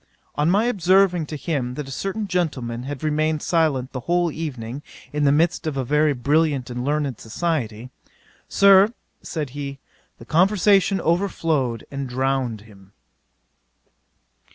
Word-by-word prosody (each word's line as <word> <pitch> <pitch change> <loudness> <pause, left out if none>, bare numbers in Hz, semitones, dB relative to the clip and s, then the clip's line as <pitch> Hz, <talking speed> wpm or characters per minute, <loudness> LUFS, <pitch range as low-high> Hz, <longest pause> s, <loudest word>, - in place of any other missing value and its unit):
On 150 +2 +1
my 205 +5 +3
observing 185 -5 +3
to 155 - -6
him 140 -5 -3
that 150 -1 -5
a - - -8
certain 195 - -3
gentleman 130 -10 -2
had 145 0 -6
remained 155 0 0
silent 150 -6 +1
the 130 - -4
whole 175 +5 0
evening, 135 -5 -5 0.3
in 150 -1 +1
the 140 - +5
midst 160 +2 +1
of 145 -3 -2
a 130 - -1
very 150 +3 +2
brilliant 140 0 +1
and 125 0 -4
learned 145 -3 -1
society, 125 -3 -3 0.6
"Sir, 200 +3 +5 0.3
(said 150 -6 -4
he,) 140 0 -6 0.4
the - - -13
conversation 195 +2 +3
overflowed, 160 - 0
and 140 -2 -4
drowned 130 -3 -1
him." 100 -2 -18
150 Hz, 140 wpm, -22 LUFS, 130-170 Hz, 0.6 s, the